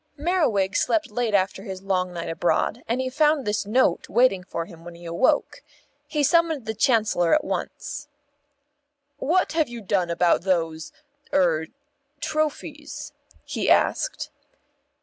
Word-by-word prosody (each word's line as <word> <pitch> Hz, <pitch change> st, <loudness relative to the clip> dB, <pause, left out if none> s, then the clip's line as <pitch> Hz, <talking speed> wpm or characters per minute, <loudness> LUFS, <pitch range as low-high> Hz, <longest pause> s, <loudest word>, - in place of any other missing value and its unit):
Merriwig 285 Hz, -, +1 dB
slept 320 Hz, -5 st, +1 dB
late 235 Hz, -4 st, 0 dB
after 190 Hz, 0 st, +1 dB
his 190 Hz, -1 st, -7 dB
long 185 Hz, -2 st, 0 dB
night 170 Hz, -1 st, -5 dB
abroad, 175 Hz, +8 st, 0 dB
and 235 Hz, +3 st, 0 dB
he 260 Hz, -, -1 dB
found 295 Hz, +1 st, +2 dB
this 210 Hz, 0 st, -1 dB
Note 220 Hz, -5 st, +2 dB
waiting 220 Hz, -4 st, +3 dB
for 170 Hz, -2 st, -4 dB
him 165 Hz, -2 st, -14 dB
when 175 Hz, 0 st, -10 dB
he 170 Hz, 0 st, -13 dB
awoke. 170 Hz, -, +1 dB, 0.5 s
He 300 Hz, -2 st, 0 dB
summoned 320 Hz, -3 st, +2 dB
the 220 Hz, -, -2 dB
Chancellor 215 Hz, -, +3 dB
at 305 Hz, -, +1 dB
once. 295 Hz, 0 st, -5 dB, 1.1 s
"What 335 Hz, +7 st, +1 dB
have 315 Hz, -5 st, +1 dB
you 240 Hz, -1 st, -7 dB
done 195 Hz, -4 st, 0 dB
about 170 Hz, 0 st, +2 dB
those 165 Hz, -4 st, -1 dB, 0.4 s
er 160 Hz, -4 st, +2 dB, 0.5 s
trophies?" 310 Hz, -1 st, -3 dB, 0.3 s
he -, -, -2 dB
asked. -, -, +1 dB
210 Hz, 140 wpm, -24 LUFS, 180-290 Hz, 1.1 s, waiting